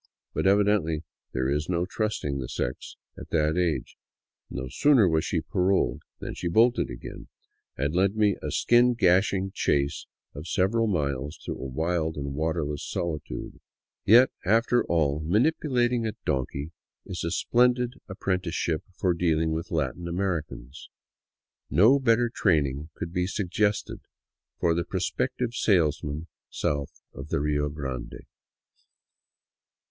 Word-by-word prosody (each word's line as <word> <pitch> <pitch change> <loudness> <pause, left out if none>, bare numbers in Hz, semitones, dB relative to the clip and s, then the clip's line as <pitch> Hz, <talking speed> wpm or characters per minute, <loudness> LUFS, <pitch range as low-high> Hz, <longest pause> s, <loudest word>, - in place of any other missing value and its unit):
But - - 0
evidently 100 -6 +2 0.3
there 65 +1 -1
is 75 +4 -1
no 90 -1 +1
trusting 95 -9 -2
the 65 -2 -5
sex - - -4 0.2
at - - -10
that 75 -1 +1
age. 90 -3 -1 0.5
No 65 - -5
sooner 130 - +4
was 80 -2 +2
she - - -1
paroled 95 +1 +1 0.2
than - - -6
she 90 - -4
bolted 115 +8 +3
again, - - -9 0.5
and 70 +3 -1
led 95 +3 +2
me 105 -3 +3
a - - -3
skin 120 +1 +4
gashing 95 -1 +2
chase 70 0 0 0.3
of 75 +4 -8
several 110 +5 +1
miles 70 -6 -1
through - - -6
a - - -4
wild 80 +4 -1
and 70 -1 -4
waterless 75 -1 -2
solitude. 80 -4 -4 0.4
Yet, 120 +5 +6
after 115 +4 +3
all, 75 -4 +1
manipulating 120 - +1
a 110 - -3
donkey 70 +3 -2 0.3
is 90 - -5
a 85 - -1
splendid 125 +5 +2 0.2
ap 95 - -7
prenticeship 85 -4 -1 0.2
for 90 -2 +2
dealing 80 -2 +1
with 80 +1 -3
Latin 80 +2 -2
Americans; 85 -8 -4 0.8
no 115 +10 +5
better 120 -2 +3
training 75 - 0
could 85 - -6
be 90 -1 0
suggested 105 +1 -1 0.6
for 85 - +3
the 85 +1 0
prospective 100 +7 -2
salesman 80 -7 +1 0.2
south 70 -1 -3
of 70 - -8
the - - 0
Rio 75 0 0
Grande. 65 -4 -6
85 Hz, 135 wpm, -27 LUFS, 75-105 Hz, 0.8 s, Yet